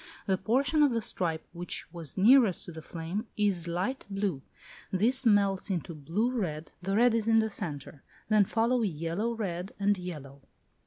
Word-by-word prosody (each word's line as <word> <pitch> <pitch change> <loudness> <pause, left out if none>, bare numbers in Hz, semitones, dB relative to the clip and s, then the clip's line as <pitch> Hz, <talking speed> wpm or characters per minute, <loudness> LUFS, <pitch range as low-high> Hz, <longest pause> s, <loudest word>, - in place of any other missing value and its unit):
The 190 - +2
portion 275 +7 +2
of 285 -4 +4
the 230 - +1
stripe 165 -5 -2
which 175 0 -3
was 165 -3 -6
nearest 225 -1 +5
to - - -8
the 160 -1 -8
flame 170 +8 -5
is 195 -5 +1
light 185 +11 -2
blue; 195 -8 -2 0.5
this 240 +7 +2
melts 200 -2 +3
into 175 -2 -2
blue 170 - -1
red; 165 -10 -3
the 195 +2 -1
red 240 +2 +5
is 225 -1 0
in 225 0 +5
the 220 -1 +2
centre; 145 -6 -6 0.3
then 215 -1 +4
follow 235 +4 +1
yellow 185 +4 -2
red 185 -3 -4
and 205 +1 +3
yellow. 145 -6 -8
195 Hz, 170 wpm, -29 LUFS, 170-225 Hz, 0.5 s, nearest